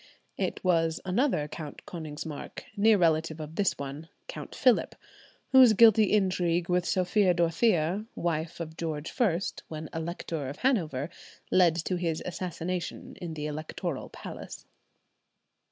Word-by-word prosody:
It - - -3
was 165 -3 +2
another 190 - +1
Count 150 -1 -8
Konigsmark, 155 -2 -7
near 215 +1 +5
relative 160 -2 +2
of 155 0 -7
this 195 +2 +1
one, 140 +3 -7 0.2
Count - - -8
Philip, 255 -4 +3 0.6
whose 260 -4 +8
guilty 220 0 +7
intrigue 180 -4 +2
with 180 0 +1
Sophia 185 0 +2
Dorothea, 175 +2 +2
wife 165 -1 -2
of 160 -1 -6
George 155 -2 -4
I, 195 -9 +4 0.3
when 155 -1 -6
Elector 165 -3 -4
of 140 - -7
Hanover, 165 - +1 0.4
led 175 -3 +5
to 180 - 0
his 165 -2 -2
assassination 180 0 -4
in 165 -3 -5
the 150 -1 -4
electoral 155 +1 -4
palace. - - -9
170 Hz, 130 wpm, -29 LUFS, 155-185 Hz, 0.6 s, whose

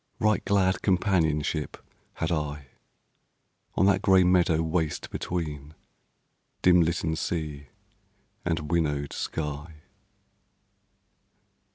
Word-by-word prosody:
Right 105 0 +2
glad 95 -2 +2
companionship 80 -6 +1 0.4
had 80 - -2
I, 75 -3 -3 1.1
On 95 - +3
that 100 -1 +3
gray 95 -3 +5
meadow 90 -3 +3
waste 80 -1 -2
between 75 -4 -4 0.9
Dim 90 -1 +6
litten 80 -1 0
sea 75 -4 -4 0.8
and 80 -3 -2
winnowed 75 -4 0
sky. 75 +1 -4
80 Hz, 85 wpm, -27 LUFS, 75-90 Hz, 1.1 s, Dim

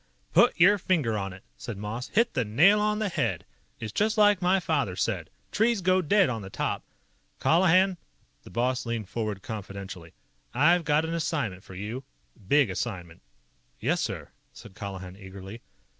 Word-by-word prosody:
"Put - - +5
your 200 +4 +6
finger 155 -12 +1
on 95 -2 -3
it," 95 +1 -12
said 110 - -6
Moss. 110 +5 -5
"Hit 230 +2 +2
the 125 - +1
nail 155 - +5
on 210 0 +1
the 215 -1 0
head. 120 - -1 0.3
It's 110 - -5
just 215 +2 +1
like 205 -3 +5
my 185 +2 +3
father 145 - -1
said: 95 -5 -2 0.2
'Trees 220 -1 +2
go 185 +1 +3
dead 195 +3 +4
on 115 -4 -3
the 95 - -8
top.' - - -2 0.6
Colihan 185 +2 +4 0.2
" - - -40
The - - -12
boss 125 +5 0
leaned 115 -4 -3
forward 105 -4 -3
confidentially. 100 -5 -7 0.4
"I've 165 +6 +4
got 150 +2 +2
an 165 - -3
assignment 145 - -2
for 95 - -12
you. 110 +8 -5 0.4
Big 140 -4 +4
assignment." 90 -5 -5 0.6
"Yes, - - 0
sir!" - - -4 0.2
said - - -13
Colihan 95 -2 -7
eagerly. 95 +2 -10
120 Hz, 170 wpm, -27 LUFS, -, 0.6 s, your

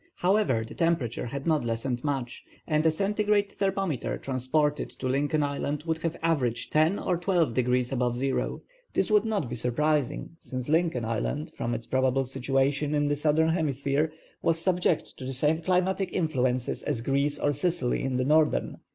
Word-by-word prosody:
However, 175 - +2
the - - -9
temperature 160 -9 0
had 140 +3 -5
not 155 -4 +2
lessened 120 +2 -2
much, 135 -4 -3 0.2
and 155 -1 +1
a - - +5
centigrade 205 +3 +1
thermometer 195 - -1
transported 145 +3 0
to - - -9
Lincoln 145 +3 +1
Island 145 +1 -2
would 160 -1 -1
have 165 0 -2
averaged 140 -8 0
10° 155 +6 +2
or 180 -3 +1
12° 125 - +1
above 125 -2 0
zero. 135 +2 -1 0.3
This - - +1
would 210 0 +4
not 210 - -1
be 120 - -6
surprising, 150 +6 -1
since 130 -1 -5
Lincoln 160 -6 +1
Island, 115 +7 -2
from 120 0 -2
its 115 0 -6
probable 130 0 +1
situation 135 +3 0
in 145 0 +1
the 145 - +2
Southern 155 +2 +2
Hemisphere, 145 -2 0 0.3
was 165 -1 +2
subject 175 -1 0
to - - -8
the 135 - -3
same 150 +5 +1
climatic 185 +2 +1
influences 130 -8 0
as 115 - -2
Greece 140 +3 0
or 145 +1 +1
Sicily 145 -3 0
in 130 -1 -1
the 130 - 0
Northern. 155 +2 +2
145 Hz, 170 wpm, -27 LUFS, 130-165 Hz, 0.3 s, a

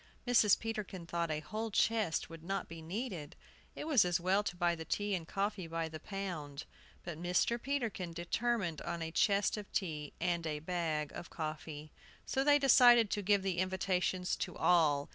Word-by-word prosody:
Mrs. 230 -5 +5
Peterkin 210 -5 -5
thought 170 0 -2
a 155 -1 -2
whole 215 +9 -4
chest 215 -4 +1
would 165 -1 -11
not 195 +3 -3
be 165 0 -9
needed: 175 - -5 0.4
it - - -5
was 290 - +5
as 175 0 +1
well 185 +3 +2
to 190 -4 -4
buy 175 -1 +2
the 165 -1 -5
tea 205 +5 -1
and 170 -4 -2
coffee 195 -2 -2
by 165 0 -2
the 155 0 -7
pound. 160 -7 -5 0.4
But 170 -2 -6
Mr. 180 +7 +1
Peterkin 235 -10 -2
determined 175 0 -1
on 170 -1 -3
a 160 - -4
chest 200 +5 +2
of 205 -2 -8
tea 155 -6 -3
and 170 -2 0
a 150 -1 -2
bag 160 -2 -2
of - - -8
coffee. 155 -1 -6 0.3
So 265 - 0
they 290 0 +6
decided 240 -5 +6
to 205 - 0
give 200 0 +2
the 185 -3 -1
invitations 185 -1 0
to - - -4
all. 150 -5 +3
180 Hz, 180 wpm, -34 LUFS, 165-205 Hz, 0.4 s, they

